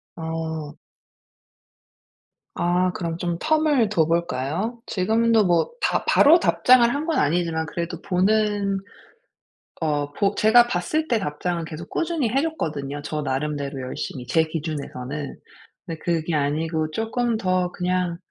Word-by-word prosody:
아. 160 -2 -4 1.8
아 180 +1 +1
그럼 170 -2 -3
좀 175 -1 -2
텀을 305 - +2
둬 170 -7 +3
볼까요? 170 - -1
지금도 220 +3 +2
뭐 175 - +2
다 - - +1
바로 315 +4 +6
답장을 250 -7 +5
한 295 +2 -2
건 330 - 0
아니지만 160 +1 +1
그래도 170 +2 -4
보는 200 +1 +1 1.0
어 145 -2 -1
보 200 +3 +1
제가 235 +3 +6
봤을 240 - -1
때 235 -5 +2
답장은 170 0 -3
계속 160 +2 -8
꾸준히 325 -7 -1
해 265 +5 +1
줬거든요, 150 - -3
저 150 0 -3
나름대로 140 0 -3
열심히 125 0 -5
제 160 +5 +3
기준에서는. 150 -3 -5 0.5
근데 165 -3 -6
그게 165 -1 -1
아니고 155 +2 0
쪼끔 225 +4 -1
더 185 -3 0
그냥 180 -1 -1
175 Hz, 255 characters per minute, -23 LUFS, 155-220 Hz, 1.8 s, 바로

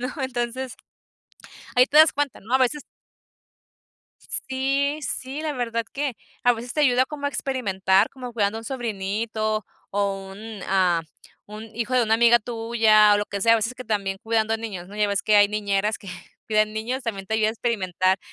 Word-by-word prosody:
¿no?, 250 +1 -3
entonces, 255 0 -3 1.0
ahí 250 +1 +7
te 295 - +1
das 310 -2 +8
cuenta, 290 -2 -2
¿no?, 230 +6 -6
a - - +6
veces 265 +3 +1 1.4
Sí 275 +3 -1
sí, 265 +2 -4
la 310 -2 -2
verdad 230 -3 -2
que 275 -5 -2 0.3
a 245 -1 +5
veces 240 +1 -6
te 305 - -1
ayuda 255 -2 +4
como 285 -1 -5
a - - +2
experimentar, 200 -8 +1
como 250 -2 -8
cuidando 210 -1 0
a - - -6
un - - -13
sobrinito, 215 -2 -2 0.3
o 195 -1 -2
un 210 0 -9
a 180 -3 +2 0.4
un 215 +1 -9
hijo 235 +2 -2
de 250 - +4
una 220 0 +2
amiga 235 +1 +6
tuya 225 -2 +4
o 205 - +2
lo 205 - -2
que 200 - -5
sea, 230 - +5
a - - +6
veces 230 +3 -2
que 255 - -9
también 200 -3 -1
cuidando 225 0 +1
niños, 195 -6 -7
¿no?, 205 - -11
ya 210 -1 +2
ves 200 -1 -1
que 210 0 +4
hay 205 0 +7
niñeras 210 0 -1
que 200 - -12 0.4
cuidan 215 0 +2
niños, 245 +5 -3
también 195 -5 -4
te 220 - -1
ayuda 215 -1 +2
a - - +1
experimentar, 190 -5 0
225 Hz, 195 wpm, -24 LUFS, 205-250 Hz, 1.4 s, das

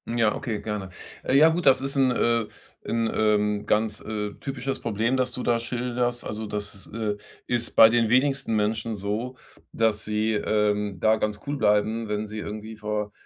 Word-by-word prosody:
Ja, 115 -3 +3
okay, 115 -5 -3
gerne. 105 -3 -4 0.4
Ja, 150 +5 +6
gut, 170 +2 -1
das 135 -1 +6
ist 135 +1 -3
'n, 130 -2 +4
äh 115 -2 +2 0.4
'n, 115 -1 0
ähm, 105 -1 +1
ganz, 105 0 +1
äh, 105 -1 -4
typisches 135 -1 -4
Problem, 115 +3 0
das 125 -1 0
du 125 - -4
da 120 -1 +2
schilderst. 120 0 -2
Also, 110 +1 -5
das 105 -1 -5
ist, 95 - -15
äh 105 -2 -2 0.3
ist 120 -1 -1
bei 110 - +9
den 115 0 +3
wenigsten 135 -2 +2
Menschen 110 +1 0
so, 105 +6 -3 0.4
dass 110 -2 +1
sie, 110 +1 0
ähm, 105 -2 0
da 110 0 +4
ganz 105 -1 -2
cool 145 +1 -2
bleiben, 110 +1 +2
wenn 105 0 -2
sie 110 +1 -6
irgendwie 110 +1 -7
vor 105 -1 -3
110 Hz, 180 wpm, -25 LUFS, 105-120 Hz, 0.4 s, bei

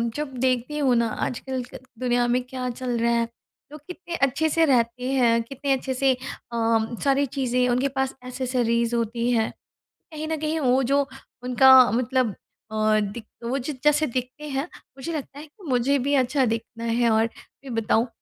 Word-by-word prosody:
जब 295 -2 -4
देखती 255 +3 0
हूँ 270 -4 +3
ना 235 -1 +2 0.2
आजकल 260 +1 -4 0.4
दुनिया 245 -1 +1
में 245 +1 +2
क्या 255 0 -4
चल 245 0 -3
रहा 235 +1 +2
है 230 - 0 0.4
लोग 300 - -10
कितने 360 -1 -6
अच्छे 280 +2 +1
से 330 +1 +3
रहते 250 -1 +1
हैं। 235 -3 +3
कितने 275 +3 -2
अच्छे 265 0 -2
से 265 +1 +3
अ, 230 -2 -2
सारी 280 0 +3
चीज़ें 250 -2 0
उनके 250 +3 +2
पास 265 0 -1
एक्सेसरीज़ 245 -2 0
होती 235 +1 -1
है। 225 -2 +2 0.6
कहीं 310 0 -5
न 320 0 -1
कहीं 315 +1 -1
वो 260 -2 +3
जो 280 +2 +2 0.4
उनका 255 +1 +5 0.2
मतलब 250 -2 0 0.4
अ, 215 0 +2
दि 205 +3 -3 0.2
वो 240 +3 -1
जो 275 +3 -4
जैसे 300 +1 +4
दिखते 255 +5 -4
हैं 270 0 -1 0.3
मुझे 270 +5 -5
लगता 285 -2 -6
है 300 - -9
कि 345 +7 -21
मुझे 260 +2 +2
भी 280 +3 0
अच्छा 260 +1 +1
दिखना 230 0 -4
है 235 +1 +2
और 220 +1 +3
फ़िर 270 +3 -14
बताऊँ 225 +1 +1
255 Hz, 180 wpm, -24 LUFS, 235-275 Hz, 0.6 s, उनका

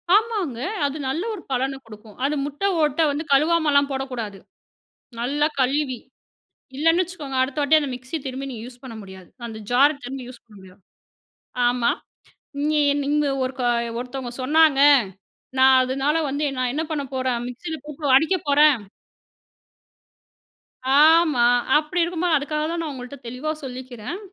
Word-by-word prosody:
ஆமாங்க, 410 - 0 0.3
அது 285 +2 -2
நல்ல 315 +7 -2
ஒரு 405 - -7
பலன 265 +1 -1
குடுக்கும். 215 -1 -14
அது 295 +2 0
முட்ட 290 +5 -7 0.2
ஓட்ட 300 +1 +1
வந்து 290 +2 -3
கழுவாமல்லாம் 295 -1 +3
போடக்கூடாது. 250 -7 -4 0.8
நல்லா 285 +5 +1
கழுவி, 265 -1 0 0.8
இல்லைன்னு 330 +5 +3
வச்சுக்கோங்க, 315 -7 -6
அடுத்த 260 +2 -3
வாட்டி 300 +2 +5
அந்த 285 -2 -3
மிக்ஸி 255 +5 -6
திரும்பி 265 +1 -5
நீங்க 230 -3 -7
யூஸ் 250 0 -13
பண்ண 245 -3 -8
முடியாது. 190 -2 -12 0.2
அந்த 225 -2 -8
ஜாரை 275 +5 +5
திரும்பி 255 0 -6
யூஸ் 250 -2 -12
பண்ண 215 -3 -18
முடியாது. 190 -1 -15 0.9
ஆமா. 240 -1 +2 0.8
"நீ 305 -1 +2 0.2
நீங்க 295 +1 +1 0.2
ஒருக்க 255 0 -4 0.4
ஒருத்தவங்க 250 0 -6
சொன்னாங்க, 300 +1 +4 0.8
நா 260 - +6 0.2
அதனால 270 +4 0
வந்து 285 +2 -2
என் 275 - -7
நான் 250 -1 0
என்ன 310 +3 -1
பண்ண 295 -2 -1
போறேன்? 255 -2 0
மிக்ஸியில 315 +7 -6
போட்டு 290 -3 +1
அடிக்க 320 +7 +2
போறேன்." 285 -5 +5 2.2
ஆமா. 315 -4 +5 0.3
அப்படி 310 +4 -1
இருக்கும்போது 340 -1 +1
அதுக்காக 300 +2 -2
தான் 340 0 -2
நான் 310 - -4
உங்கள்ட்ட 255 +1 -9
தெளிவா 255 +6 -3
சொல்லிக்கிறேன், 255 - -7
275 Hz, 145 wpm, -23 LUFS, 250-305 Hz, 2.2 s, நா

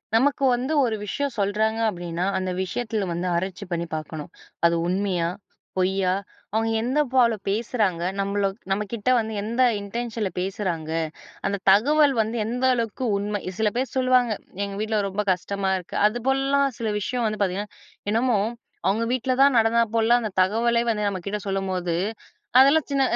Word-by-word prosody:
நமக்கு 275 +4 +2
வந்து 260 +6 -2
ஒரு 225 -2 0
விஷயம் 280 +5 -2
சொல்றாங்க 215 +3 +1
அப்படின்னா, 175 -2 -3
அந்த 185 0 -2
விஷயத்துல 220 +1 -2
வந்து 175 +2 -2
ஆராய்ச்சி 190 +3 -3
பண்ணி 170 0 -1
பார்க்கணும். 155 0 -6 0.3
அது 170 0 +4
உண்மையா, 180 -2 0 0.5
பொய்யா, 185 0 +2 0.4
அவுங்க 225 +1 +1
எந்த 260 +5 0
போல 240 -3 +5 0.2
பேசுறாங்க, 210 -4 0 0.2
நம்மள 200 +1 0 0.3
நம்ம 200 +2 +1
கிட்ட 230 +2 -1
வந்து 220 0 -3
எந்த 230 +5 -1 0.2
இன்டென்ஷன்ல 225 0 -3
பேசுறாங்க. 180 -4 -3 0.6
அந்த 200 - 0
தகவல் 285 +8 +5
வந்து 220 +2 -3
எந்த 245 +3 -2
அளவுக்கு 230 +1 -2
உண்மை. 205 +1 -2 0.2
சில 220 -1 +2
பேரு 255 +1 0
சொல்லுவாங்க, 255 -2 +3 0.3
எங்க 200 0 -5
வீட்ல 215 0 0
ரொம்ப 200 +2 -2
கஷ்டமா 195 +2 -2
இருக்கு. 180 - -8
அதுபோலலாம் 270 +4 +1
சில 225 -2 -1
விஷயம் 240 +4 -2
வந்து 215 -1 -3
பார்த்தீங்கன்னா, 200 +1 -1 0.4
என்னமோ 230 +1 +2 0.5
அவுங்க 215 +4 +2
வீட்ல 255 +1 0
தான் 275 -2 +6
நடந்தா 230 +1 +4
போலலாம் 230 +2 +4
அந்த 215 - -2
தகவலே 230 +5 +2
வந்து 210 -2 -1
நம்ம 195 -2 -3
கிட்ட 205 +1 -2
சொல்லும்போது, 190 -3 -1 0.6
அதெல்லாம் 280 +3 +6
சின்ன 275 -1 +2
215 Hz, 155 wpm, -24 LUFS, 195-240 Hz, 0.6 s, தான்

